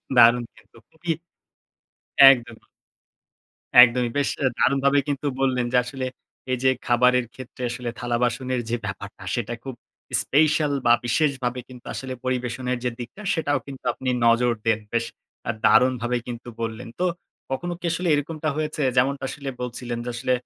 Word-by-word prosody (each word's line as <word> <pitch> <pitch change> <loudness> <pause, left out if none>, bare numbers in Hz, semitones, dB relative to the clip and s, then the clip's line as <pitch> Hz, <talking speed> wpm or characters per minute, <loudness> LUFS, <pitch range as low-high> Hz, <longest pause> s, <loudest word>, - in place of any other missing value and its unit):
দারুন 120 0 +7
কিন্তু 110 +1 -21
খুবই। 165 +1 -4 1.2
একদমই। 120 -4 -1 1.2
একদমই 120 0 +4
বেশ 140 - +2 0.2
আ - - +5
দারুণভাবে 140 +1 +3
কিন্তু 145 +1 -2
বললেন 130 -2 +1
যে - - +3
আসলে, 130 +1 -5 0.5
এই 125 - 0
যে 130 - +6 0.2
খাবারের 125 0 +3
ক্ষেত্রে 130 0 -10
আসলে 120 0 -4
থালাবাসনের 125 +1 -1
যে 120 - +1
ব্যাপারটা 100 0 -7
সেটা 120 0 -2
খুব 135 -2 -6 0.5
স্পেশাল, 150 0 +2
বা 120 - +7
বিশেষভাবে 125 -2 0
কিন্তু 125 -1 -13
আসলে 130 -1 -5
পরিবেশনের 125 0 -2
যে 125 - +1
দিকটা 125 - -8
সেটাও 145 -4 0
কিন্তু 135 -2 -10
আপনি 130 - -5 0.2
নজর 120 +1 +4
দেন। 110 -1 +2
বেশ 115 0 +1 0.4
আ - - +3 0.2
দারুণভাবে 125 0 +3
কিন্তু 120 0 -7
বললেন। 115 0 -4
তো 180 - +3 0.4
কখনো 175 +7 -2
কি - - -21
আসলে 175 +1 -1
এরকমটা 155 +2 -2
হয়েছে? 155 -1 -2
যেমনটা 135 +2 +2
আসলে 140 0 -7
বলছিলেন, 120 -1 -4
যে 120 - -3
আসলে 125 +2 0
125 Hz, 150 wpm, -24 LUFS, 120-140 Hz, 1.2 s, দারুন